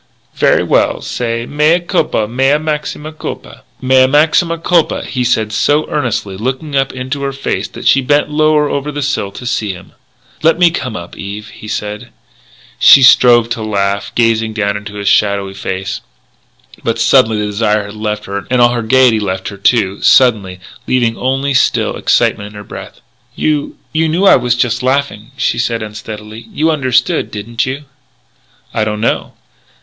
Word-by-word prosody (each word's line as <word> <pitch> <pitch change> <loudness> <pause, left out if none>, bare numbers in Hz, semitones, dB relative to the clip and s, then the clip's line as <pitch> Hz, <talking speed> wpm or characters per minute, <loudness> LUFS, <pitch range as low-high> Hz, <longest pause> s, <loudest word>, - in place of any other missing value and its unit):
"Very - - +2
well. - - +1
Say 115 -1 -3
'Mea 150 +5 +2
culpa, 170 - 0
mea 135 +5 +2
maxima 155 0 -4
culpa.'" 155 - -8 0.2
"Mea 130 0 +4
maxima 160 +4 +2
culpa," 165 0 +1
he 125 -2 -2
said 110 -3 0
so 145 +7 +1
earnestly, 120 - -2
looking 130 +6 -4
up 135 0 +1
into 130 +2 -5
her 140 0 -2
face 135 0 -3
that - - -11
she 135 - +4
bent 145 +3 +2
lower 155 0 +2
over 145 +1 -3
the 145 0 -4
sill 130 -8 -2
to 125 - -9
see 110 -4 -2
him. 90 +1 -13 0.5
"Let 165 +1 +3
me 175 -1 +4
come 130 -8 -4
up, 85 -3 -8
Eve," 105 +2 -7
he 105 - -12
said. 105 -1 -5 0.7
She 135 - +8
strove 120 -2 +6
to 115 - -3
laugh, 100 -2 -1
gazing 115 -1 +1
down 100 -2 -1
into 100 0 -7
his 100 -1 -5
shadowy 100 -2 +1
face 95 0 -4 0.8
but 115 0 -1
suddenly 115 -1 +3
the 105 - -1
desire 105 0 0
had 100 - -9
left 105 0 -3
her, 100 0 -5
and 125 - +1
all 120 0 +6
her 120 -1 -2
gaiety 125 -1 +3
left 95 -2 -3
her, 100 - -10
too, 100 -1 +1
suddenly, 105 -8 +3 0.3
leaving 120 -3 +1
only 135 +3 -1
a - - +1
still 130 - +1
excitement 100 - +1
in 105 - -13
her 105 - -8
breast. - - -10 0.3
"You 150 -2 -1 0.2
you 160 0 +1
knew 175 +5 +1
I - - +7
was 125 -1 +1
just 120 0 0
laughing," 130 -4 -1
she 115 - 0
said 115 -1 -1
unsteadily. 110 +1 -9
"You 160 +2 +1
understood, 140 +3 0
didn't 115 +4 -3
you?" 135 +3 -4 0.9
"I 110 - 0
don't 105 -1 -3
know." 115 - -1
120 Hz, 175 wpm, -14 LUFS, 105-140 Hz, 0.9 s, She